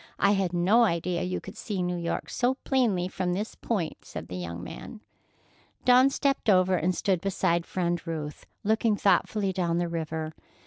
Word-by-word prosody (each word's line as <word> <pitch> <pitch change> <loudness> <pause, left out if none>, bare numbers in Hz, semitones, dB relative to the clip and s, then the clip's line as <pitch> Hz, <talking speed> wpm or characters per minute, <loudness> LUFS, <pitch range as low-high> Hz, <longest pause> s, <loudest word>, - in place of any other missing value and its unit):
I 200 - +4
had 195 -3 +1
no 185 +7 +4
idea 175 -3 0
you 180 0 -2
could - - -10
see 195 -4 -3
New 180 0 -1
York 170 -1 -3
so 250 +2 +1
plainly 225 -10 +2
from 180 -1 -2
this 205 +4 -3
point," 195 -9 -3
said 80 +3 -8
the 90 - -5
young 85 -1 -5
man. 215 - -9 0.8
Dawn 255 +2 +7
stepped 275 -4 0
over 185 -1 +5
and 180 +1 +1
stood 185 -2 +1
beside 180 -3 0
Friend 175 -2 -1
Ruth, 150 -3 -5 0.2
looking 220 +1 +2
thoughtfully 195 0 +2
down 170 -2 0
the 175 0 0
river. 160 -1 -3
180 Hz, 175 wpm, -27 LUFS, 170-205 Hz, 0.8 s, Dawn